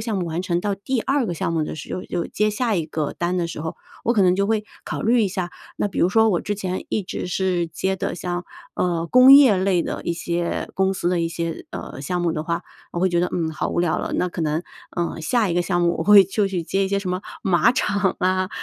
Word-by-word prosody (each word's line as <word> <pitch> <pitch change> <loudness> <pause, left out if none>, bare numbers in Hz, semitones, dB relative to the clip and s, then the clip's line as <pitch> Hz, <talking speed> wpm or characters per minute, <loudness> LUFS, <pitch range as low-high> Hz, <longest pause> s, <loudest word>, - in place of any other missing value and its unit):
项 220 -2 -2
目 175 - -2
完 165 +2 -2
成 175 -1 0
到 205 0 -1
第 235 +5 -2
2 275 -2 +1
个 175 -5 -2
项 165 - -2
目 160 -2 +1
的 155 - -4
时 - - -6
候， 180 - -4
就 175 -1 -3
接 210 +1 0
下 225 +1 0
一 165 -4 0
个 155 -1 -3
单 175 +1 -1
的 170 -1 0
时 165 - -6
候， 160 0 -5 0.3
我 235 - +3
可 205 -5 +3
能 180 0 +4
就 200 +1 +1
会 215 -1 +1 0.2
考 - - -4
虑 235 +1 +3
一 200 - +1
下。 180 -2 -3 0.3
那 - - 0
比 - - -6
如 175 - +4
说 220 +2 +4
我 175 - +1
之 205 - -2
前 185 -2 -4
一 210 - -1
直 180 - -5
是 180 -1 0
接 190 +4 -2
的 - - -3
像， 175 0 -4 0.3
呃， 170 -2 0
工 255 +6 +8
业 270 -8 +8
类 185 -2 +2
的 - - -4
一 170 - 0
些 170 0 -2
公 190 0 +2
司 175 - -1
的 180 -1 +1
一 165 - 0
些， 165 -1 -4
呃， - - -7
项 175 +5 -2
目 170 - +1
的 155 - -3
话， 170 +1 -2 0.3
我 175 - -3
会 185 - +3
觉 175 -1 +1
得， 180 - +2
嗯， 165 -2 -1
好 155 - -3
无 - - 0
聊 175 -2 +1
了。 - - -4
那 180 - +1
可 170 - -6
能， 155 +2 0 0.3
呃， 170 -1 -2
下 215 +6 +1
一 170 - -1
个 175 - +2
项 175 -1 0
目 170 0 +2
我 - - 0
会 205 0 +9
就 200 +2 0
去 185 -3 -2
接 195 +4 0
一 - - -2
些 200 0 +1
什 195 -2 -4
么 180 +1 -2 0.2
马 190 +5 +4
场 205 -6 0
啊， 185 0 +1
180 Hz, 290 characters per minute, -22 LUFS, 170-200 Hz, 0.3 s, 会